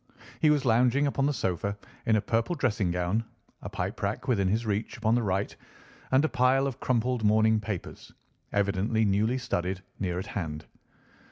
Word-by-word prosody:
He 155 - +5
was 145 -2 +2
lounging 125 +4 +3
upon 140 -1 +1
the - - +2
sofa 100 - -2 0.3
in 110 - +4
a 105 - +2
purple 115 - 0
dressing 115 - 0
gown, 90 +5 0 0.4
a - - -6
pipe - - -4
rack - - -2
within 100 -7 +2
his 110 +5 0
reach 105 +2 -2
upon 110 -1 +1
the 120 - +3
right, 95 -1 -1 0.6
and 135 +4 +4
a - - +3
pile 130 0 +3
of 135 -3 -3
crumpled 125 -1 0
morning 110 +1 +4
papers, 105 -4 -6 0.4
evidently 100 +2 +1
newly 105 +5 +2
studied, 95 -6 -2 0.2
near 90 -3 -1
at 95 - -3
hand. 80 -6 -5
110 Hz, 175 wpm, -28 LUFS, 100-125 Hz, 0.6 s, He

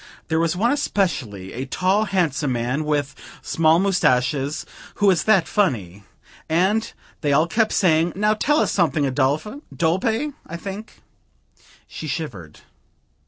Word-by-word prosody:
There 160 0 +1
was 165 +1 +1
one 230 +7 +2
especially, 150 - -2
a 130 +3 -5
tall 190 +8 +1
handsome 165 -8 0
man 125 +6 -2
with 145 -2 -1 0.3
small 160 0 +3
moustaches, 150 -5 +1 0.3
who 205 - 0
was 190 -3 +3
that 215 -5 +4
funny! 105 - -1 0.4
And 195 +8 +1 0.3
they 145 - 0
all 155 +3 +4
kept 215 +6 +1
saying, 165 -2 +2
'Now 210 +2 +2
tell 295 +8 +1
us - - +1
something, 160 -5 +1
Adolphe 145 - -1
Dolpe,' 220 - 0
I 170 - -6
think." 200 +4 -9 0.8
She 155 - -7
shivered. 110 - -6
165 Hz, 135 wpm, -22 LUFS, 140-200 Hz, 0.8 s, that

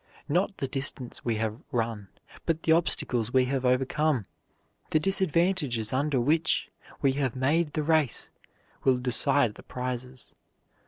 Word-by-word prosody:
Not 185 +6 0
the 135 - -2
distance 130 -2 -4
we 115 -2 0
have 110 +1 -3
run, 115 -4 -2 0.4
but 165 -1 0
the 160 - +2
obstacles 125 -8 +1
we 130 0 +4
have 130 0 -2
overcome, 130 0 +1 0.6
the 155 - +3
disadvantages 170 - +1
under 140 0 +1
which 155 +6 +1 0.3
we 135 - +4
have 135 -3 -1
made 150 +4 +1
the 155 - -1
race, 155 -5 +1 0.5
will 130 -2 +4
decide 125 0 +3
the - - -13
prizes. 125 0 -6
135 Hz, 140 wpm, -27 LUFS, 125-155 Hz, 0.6 s, we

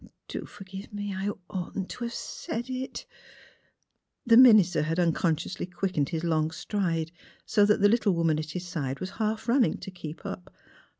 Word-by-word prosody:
Do - - -5
forgive 195 0 -10
me. 205 -1 -4
I 190 +2 -2 0.2
oughtn't 190 0 -4
to 240 - -5
have 235 - -4
said 240 +3 -5
it! 260 +1 -5 0.6
" - - -45
The 230 -1 +6
minister 215 -9 +7
had 160 +2 -1
unconsciously 170 0 0
quickened 180 -5 -1
his 165 0 -3
long 160 -2 +1
stride 165 -1 -2 0.3
so 205 -1 +4
that 210 - +3
the 205 - +7
little 215 -2 +3
woman 165 -2 +2
at 155 0 -5
his 180 +3 -5
side 140 -6 -3
was 185 0 -5
half 220 +1 -1
running 240 0 +3
to 195 - -8
keep 165 -4 -9
up. 180 - -6
185 Hz, 175 wpm, -28 LUFS, 165-210 Hz, 0.6 s, minister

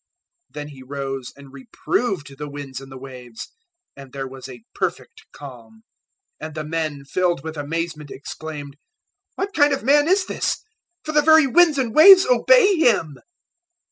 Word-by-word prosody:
Then 150 0 -8
He 135 -3 -13
rose 135 -1 -6
and 140 -1 -15
reproved 145 - -3
the 150 0 -6
winds 140 -2 -8
and 135 0 -13
the 135 - -9
waves, 125 -3 -10 0.5
and 135 -2 -13
there 135 0 -6
was 130 0 -11
a 120 -3 -12
perfect - - -5
calm; 115 -6 -13 0.6
008:027 155 - -4
and 160 - -13
the 155 - -4
men, 155 -3 -4
filled 175 0 -1
with 160 0 -7
amazement, 155 0 -5
exclaimed, 145 0 -9 0.6
"What 395 +1 -4
kind 290 0 +3
of 270 - -9
man 290 +4 +3
is 380 +2 +2
this? - - -3 0.4
for 310 - -4
the 300 -1 +3
very 315 0 +6
winds 320 +2 +4
and 245 -5 -1
waves 370 +5 +8
obey - - +4
him!" 205 - +1
150 Hz, 165 wpm, -21 LUFS, -, 0.6 s, waves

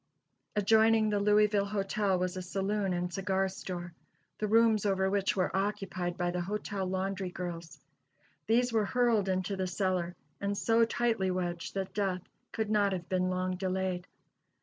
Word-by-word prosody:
Adjoining 220 +1 +4
the 205 - +1
Louisville 210 0 +3
Hotel 200 -1 0
was 180 +1 -1
a 185 - -4
saloon 195 +2 -1
and 175 0 -2
cigar 195 +1 0
store, 175 -2 -6 0.5
the 215 - 0
rooms 225 -1 +4
over 190 -1 +1
which 200 -1 +1
were 185 -1 0
occupied 190 -3 -2
by 175 -1 0
the 180 0 -2
hotel 200 0 -3
laundry 190 0 -2
girls. 175 -2 -6 0.7
These 240 +2 +3
were 220 -2 +3
hurled 230 -4 +2
into 185 +1 -1
the 190 -1 -2
cellar, 180 -2 -1 0.2
and 200 0 -1
so 230 +2 +4
tightly 225 -4 0
wedged 175 -1 -3
that 195 -1 -3
death 190 -3 -1 0.3
could 220 -2 -2
not 205 -2 +3
have 175 -2 -5
been 185 -1 +1
long 185 0 -1
delayed. 185 -1 -2
195 Hz, 160 wpm, -31 LUFS, 185-210 Hz, 0.7 s, Adjoining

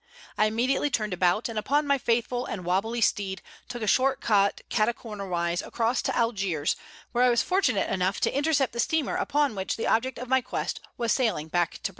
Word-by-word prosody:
I 215 - +3
immediately 255 +6 +1
turned 215 -6 -1
about, 180 +4 +2
and 225 -2 -3
upon 290 +7 +1
my 280 -1 +2
faithful 245 +1 0
and 180 -4 -5
wobbly 210 +7 0
steed 195 -3 0 0.3
took 240 -2 -5
a - - -2
short 260 +6 +3
cut 200 -2 +2
catacornerwise 200 -6 -1
across 235 +1 0
to - - -2
Algiers, 195 -10 0 0.4
where 245 +1 +2
I 250 - +5
was 235 -1 +3
fortunate 285 - +1
enough 185 +1 0
to - - +1
intercept 280 -3 +1
the 235 - -5
steamer 300 +5 +1
upon 290 -2 +1
which 190 -2 -3
the 225 - -2
object 255 +3 +1
of 250 - -6
my 260 +1 +3
quest 250 - -3 0.2
was 235 -2 0
sailing 215 - 0
back 175 -1 +1
to - - -8
Britain. - - -1
230 Hz, 200 wpm, -27 LUFS, 195-255 Hz, 0.4 s, I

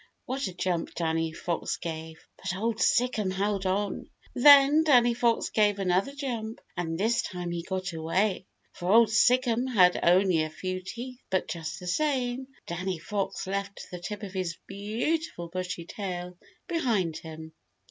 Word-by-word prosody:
What 270 +2 -2
a 185 - -6
jump 180 -2 -2
Danny 165 -1 0
Fox 170 +1 -3
gave. 160 -1 -7
But 185 - -4
Old 225 +1 0
Sic'em 235 -5 +2
held 195 0 -1
on. 200 +1 -1 0.2
Then 285 +3 +7
Danny 245 -6 +5
Fox 235 -1 +1
gave 210 -2 +2
another 190 +5 +1
jump, 235 -6 -4 0.2
and 165 -2 -2
this 230 +3 +2
time 180 -1 -5
he 170 0 -2
got 185 +1 -4
away, 185 +5 0 0.3
for 175 +1 -2
Old 230 +1 +7
Sic'em 245 +1 +3
had 180 -6 +5
only 180 -1 +4
a 155 - -1
few 185 +4 -4
teeth. 240 +7 -8
But 190 -1 0
just 160 -2 -5
the 180 - -9
same, 255 +3 0 0.2
Danny 180 +1 -3
Fox 195 +4 -3
left 200 +1 -4
the 180 - -6
tip 205 +4 -6
of 195 -2 -6
his 185 -3 -3
beautiful 210 - -2
bushy 180 -1 -4
tail 180 -2 -5 0.3
behind 225 - 0
him. 160 0 -9
195 Hz, 160 wpm, -28 LUFS, 175-235 Hz, 0.3 s, Then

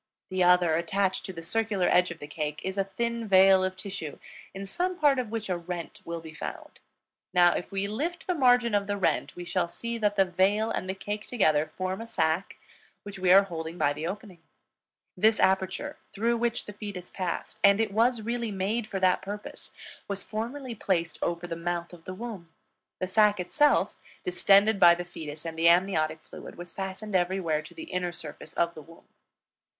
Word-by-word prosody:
The 185 -1 +2
other, 175 -2 +5
attached 190 +3 0
to - - -5
the 165 -3 -8
circular 210 0 0
edge 180 0 +4
of 170 - -7
the 145 - -8
cake, 150 0 -4
is 190 0 -3
a 195 - +1
thin 235 +3 -3
veil 190 -1 +6
of 185 0 -2
tissue, 185 -8 -6 0.3
in 195 +1 -7
some 360 - -2
part 285 -4 +4
of 245 -4 -3
which 225 -1 -4
a 185 - 0
rent 170 -1 -6
will 170 0 -5
be 160 -1 -10
found. - - -8 0.6
Now, 175 -1 +6
if - - -4
we 195 0 -1
lift 320 +12 -3
the 365 - 0
margin 245 -6 +4
of 200 -1 +1
the 205 0 -1
rent, 195 - 0
we 175 - -7
shall 175 -1 0
see 235 +5 -5
that 210 -1 +1
the 195 -1 +4
veil 195 +5 +2
and 185 - -3
the 190 - -2
cake 210 +2 -5
together 155 -9 +2
form 185 +2 -2
a 230 - -7
sac 165 -4 0 0.5
which 200 -1 -8
we 180 -1 +3
are 195 +2 +8
holding 165 -3 -6
by 145 -3 +2
the 155 +3 -4
opening. 195 -1 -7 0.8
This 215 +4 +3
aperture 190 0 +1 0.2
through 235 +3 +1
which 235 0 -1
the 210 - -8
fetus 200 -3 -7
passed, 185 -3 -4
and 200 0 +6
it 225 -2 +1
was 230 +1 +2
really 235 0 -2
made 210 +3 -1
for 195 - -3
that 185 -1 +3
purpose, 205 +1 -7 0.4
was 200 -1 -3
formerly 240 +4 -4
placed 170 -6 -1
over 170 0 -1
the 170 - -4
mouth 175 +1 -3
of 165 -2 -14
the 185 - -6
womb; 200 -6 -7 0.5
the 185 - 0
sac 210 +1 +3
itself, 295 +11 +2 0.2
distended 200 +3 +4
by 170 -2 +8
the 175 0 -5
fetus 155 -2 -8
and 160 -1 -5
the 170 +1 +6
amniotic 165 -3 +2
fluid, - - -11
was 175 -1 -9
fastened 195 +2 -5
everywhere 175 -4 +1
to 155 - -13
the 325 - -7
inner 180 -1 -1
surface 155 -1 -8
of 170 0 +1
the 155 - -10
womb. 165 +3 -17
190 Hz, 200 wpm, -28 LUFS, 175-215 Hz, 0.8 s, are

